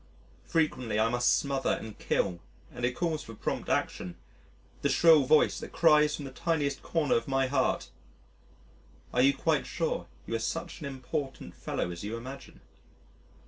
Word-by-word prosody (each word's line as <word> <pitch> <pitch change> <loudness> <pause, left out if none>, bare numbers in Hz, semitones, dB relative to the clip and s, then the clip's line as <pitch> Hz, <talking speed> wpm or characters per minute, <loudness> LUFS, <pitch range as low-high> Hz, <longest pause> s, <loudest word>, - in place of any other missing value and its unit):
Frequently 140 - 0
I 110 +1 +3
must 120 0 +2
smother 135 -1 0
and 110 -2 -8
kill 85 -1 0 0.3
(and 125 - -7
it 125 0 -1
calls 165 -1 -1
for 115 - -10
prompt - - -3
action) 90 -1 -1 0.7
the 140 - +2
shrill 155 0 +6
voice 155 +3 +4
that - - -8
cries 150 -2 +5
from 145 - -7
the 135 - -7
tiniest 145 -1 -1
corner 160 -4 0
of 115 - +1
my 135 -1 +2
heart, 130 0 0 1.2
"Are 125 - +3
you 135 +2 +5
quite - - +1
sure - - -2 0.2
you - - -5
are 115 - +1
such 165 +11 -3
an 150 - -5
important 135 +1 -5
fellow 90 - -3
as 85 +1 -7
you 110 +3 -3
imagine?" 130 +4 -10
135 Hz, 165 wpm, -29 LUFS, 120-150 Hz, 1.2 s, shrill